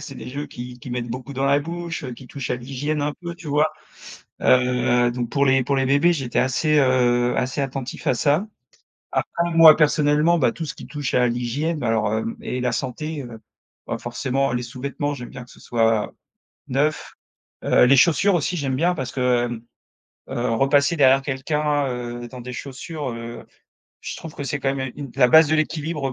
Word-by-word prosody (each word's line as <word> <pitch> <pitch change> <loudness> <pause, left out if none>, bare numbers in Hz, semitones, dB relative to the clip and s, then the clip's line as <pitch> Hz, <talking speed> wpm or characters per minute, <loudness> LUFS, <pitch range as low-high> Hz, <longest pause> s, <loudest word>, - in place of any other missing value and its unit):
c'est 145 -2 -8
des - - -8
jeux 145 +3 -5
qui 125 0 -9
qu'ils 120 +1 -8
mettent 120 -1 -3
beaucoup 130 +3 -6
dans 135 +1 -2
la 140 +1 +4
bouche, 170 0 -5
heu, 125 - -5
qui 125 +2 -11
touchent 135 0 -6
à 125 - +1
l'hygiène 140 +5 -3
un 145 0 -1
peu, 170 -1 -6
tu 165 -3 -10
vois? 150 +2 +2 0.7
Heu, 125 -1 +3
donc 120 -1 -3
pour 140 -1 +2
les 135 -1 +4
pour 140 +2 0
les 135 - +2
bébés, 145 +6 +4
j'étais 135 -5 -2
assez, 150 +4 +2
heu, 125 -2 +3
assez 130 +3 -1
attentif 135 -1 -5
à - - +3
ça. 150 - +1 0.7
Après 170 0 -1
moi 165 -2 +9
personnellement, 150 +2 +3
bah 120 -4 +3
tout 165 - -6
ce - - -5
qui - - -11
touche 145 -3 -4
à 125 0 +4
l'hygiène 125 +7 -2
bah 120 - -2
alors, 110 -2 +1
hem, 225 - -2
et 125 - -4
la 125 -1 0
santé, 145 +5 -4
heu, 120 -3 -9 0.5
bah - - -2
forcément 130 +2 -1
les 125 0 -1
sous-vêtements, 140 +3 -4
j'aime 125 -3 -8
bien 125 - -9
que 125 - -17
ce - - -17
soit 115 -2 +1 0.6
neuf. 145 +4 -1 0.5
Heu, - - +5
les 135 +2 +5
chaussures 175 +7 +4
aussi 175 +2 -1
j'aime 135 -3 -1
bien 175 +6 +2
parce 130 -6 -4
que, 125 -2 +1
hem, 120 -1 -6 0.7
heu, 120 0 -2
repasser 140 +5 +3
derrière 135 -2 +5
quelqu'un, 145 +1 -1
heu, 120 -1 -5
dans 125 0 -10
des 125 +1 -7
chaussures, 140 +2 -6
heu, 115 0 -8 0.6
je - - -4
trouve 165 -2 -9
que 145 - -6
c'est 140 +2 -2
quand 135 0 0
même 130 -2 -4
une 140 -3 -7
la 125 -2 +5
base 160 +2 +7
de 155 - +2
l'équilibre 155 -3 -1
135 Hz, 205 wpm, -22 LUFS, 125-150 Hz, 0.7 s, moi